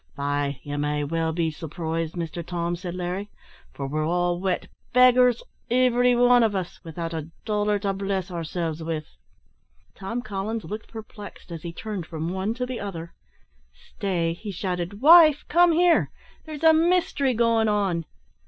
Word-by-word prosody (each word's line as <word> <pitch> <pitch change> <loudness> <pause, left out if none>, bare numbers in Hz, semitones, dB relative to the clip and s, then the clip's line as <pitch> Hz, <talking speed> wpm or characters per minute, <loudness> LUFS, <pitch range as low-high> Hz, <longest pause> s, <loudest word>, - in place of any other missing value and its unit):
"Faix, 145 0 -1
ye 145 0 -5
may 150 0 -1
well 165 +2 -1
be 165 0 -1
surprised, 160 +1 -4
Mister 170 0 -4
Tom," 170 0 -3
said 175 0 -6
Larry, 180 +3 -4 0.4
"for 140 - -6
we're 155 +3 -2
all 175 +2 0
wet 185 -1 -1 0.3
beggars, 250 -1 +5 0.3
ivery 245 0 +3
wan 245 0 +5
o' 210 -3 +1
us 180 -1 -8
without 165 0 -5
a 160 -1 -5 0.2
dollar 210 -1 +1
to 200 -1 -1
bless 195 -1 -3
ourselves 165 -1 -3
with." 160 -1 -3 0.9
Tom 230 +6 -5
Collins 215 +2 -4
looked 215 +2 -7
perplexed, 215 -4 -10
as 165 -2 -6
he 170 - -6
turned 195 -1 -6
from 165 +1 -4
one 190 +4 -2
to 250 +1 -2
the 250 -1 -5
other. 170 -4 -6 0.6
"Stay," 170 - -3
he 205 +5 -8
shouted; 180 +1 -4
"wife, 310 -1 +7
come 345 +1 +5
here. 345 +1 +3 0.4
There's 310 -1 -8
a 320 0 +7
mystery 320 -6 +2
going 230 -1 +3
on. 195 -6 0
190 Hz, 160 wpm, -25 LUFS, 165-230 Hz, 0.9 s, wife